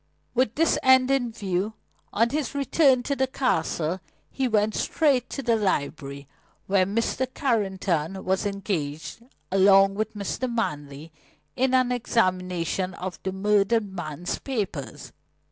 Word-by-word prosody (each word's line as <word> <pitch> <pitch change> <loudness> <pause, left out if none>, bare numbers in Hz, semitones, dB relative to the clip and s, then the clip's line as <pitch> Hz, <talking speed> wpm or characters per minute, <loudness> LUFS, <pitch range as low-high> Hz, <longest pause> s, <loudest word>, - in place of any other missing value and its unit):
With 250 -3 +1
this 330 +2 +2
end 260 0 +5
in 250 -4 +1
view, 205 -1 -2 0.4
on 230 +3 +2
his 295 -1 -2
return 275 -2 +3
to 280 - -1
the 265 -1 +1
Castle, 175 - -1 0.3
he 265 -1 0
went 215 -2 +2
straight 275 -6 +1
to 275 - -5
the 235 -1 +3
library, 140 -8 -2 0.4
where 190 -1 +2
Mr. 230 +5 -1
Carrington 190 - -1
was 190 +2 +1
engaged, 185 -4 -4 0.3
along 195 0 +6
with 215 +2 -3
Mr. 240 +5 -3
Manley, 150 -8 -4 0.4
in 260 0 +2
an 255 -1 +3
examination 185 -6 0
of 185 0 -6
the 190 - -3
murdered 205 +1 +1
man's 175 -1 -4
papers. 200 - -4
205 Hz, 130 wpm, -25 LUFS, 185-250 Hz, 0.4 s, along